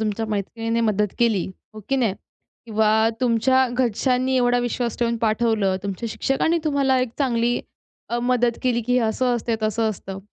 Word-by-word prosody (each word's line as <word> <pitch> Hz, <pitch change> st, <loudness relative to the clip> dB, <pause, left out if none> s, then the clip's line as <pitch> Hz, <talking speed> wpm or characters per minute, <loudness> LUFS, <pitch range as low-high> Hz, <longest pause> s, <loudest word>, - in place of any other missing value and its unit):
तुमच्या 220 Hz, 0 st, -1 dB
मैत्रिणीने 225 Hz, +3 st, -2 dB
मदत 210 Hz, -3 st, +1 dB
केली 225 Hz, -6 st, +2 dB, 0.3 s
हो 215 Hz, -, -8 dB
की 270 Hz, -, +2 dB
नाही? 225 Hz, -7 st, +1 dB, 0.5 s
किंवा 220 Hz, -1 st, +1 dB, 0.3 s
तुमच्या 255 Hz, +2 st, +3 dB
घरच्यांनी 255 Hz, +1 st, 0 dB
एवढा 245 Hz, 0 st, +3 dB
विश्वास 240 Hz, -1 st, -2 dB
ठेवून 235 Hz, -1 st, 0 dB
पाठवलं 215 Hz, -3 st, +1 dB
तुमच्या 200 Hz, +3 st, -4 dB
शिक्षकांनी 320 Hz, +9 st, 0 dB
तुम्हाला 275 Hz, -3 st, +2 dB
एक 255 Hz, -2 st, -1 dB
चांगली 240 Hz, -3 st, +1 dB, 0.5 s
अ, 240 Hz, -, -1 dB
मदत 245 Hz, -1 st, +1 dB
केली, 245 Hz, -2 st, +1 dB
की 245 Hz, +2 st, -2 dB
हे 250 Hz, -, +4 dB
असं 245 Hz, +2 st, 0 dB
असतं, 230 Hz, 0 st, -1 dB
तसं 220 Hz, +1 st, +1 dB
असतं. 195 Hz, -1 st, -7 dB
235 Hz, 165 wpm, -22 LUFS, 215-250 Hz, 0.5 s, हे